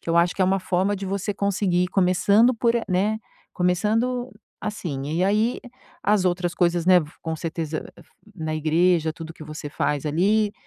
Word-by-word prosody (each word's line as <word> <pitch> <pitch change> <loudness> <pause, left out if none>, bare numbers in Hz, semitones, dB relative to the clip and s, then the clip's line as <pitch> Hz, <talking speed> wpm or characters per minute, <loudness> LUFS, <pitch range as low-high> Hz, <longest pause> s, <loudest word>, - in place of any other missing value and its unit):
que - - -11
eu 170 - +2
acho 175 +1 +3
que 190 - +1
é - - +5
uma 190 +1 +1
forma 185 +2 0
de 195 0 -5
você 200 +2 -2
conseguir 190 -3 +1
começando 200 +6 +3
por 235 +1 +1
a 235 - -1
né, 200 +4 +1 0.4
começando, 225 +8 0 0.3
assim, 170 -10 -4
e 180 - +2
aí 215 +5 +1 0.4
as 205 -2 +2
outras 175 -1 -1
coisas, 170 -1 +1
né, 185 -1 +7
v 150 -2 -8
com 160 -1 -3
certeza 160 -1 -4 0.5
na 160 -3 -3
igreja, 160 +1 +2
tudo 160 0 -9
o - - -7
que - - -12
você 155 -1 -7
faz 145 -1 -1
ali, 205 +7 +2
180 Hz, 185 wpm, -24 LUFS, 165-205 Hz, 0.5 s, né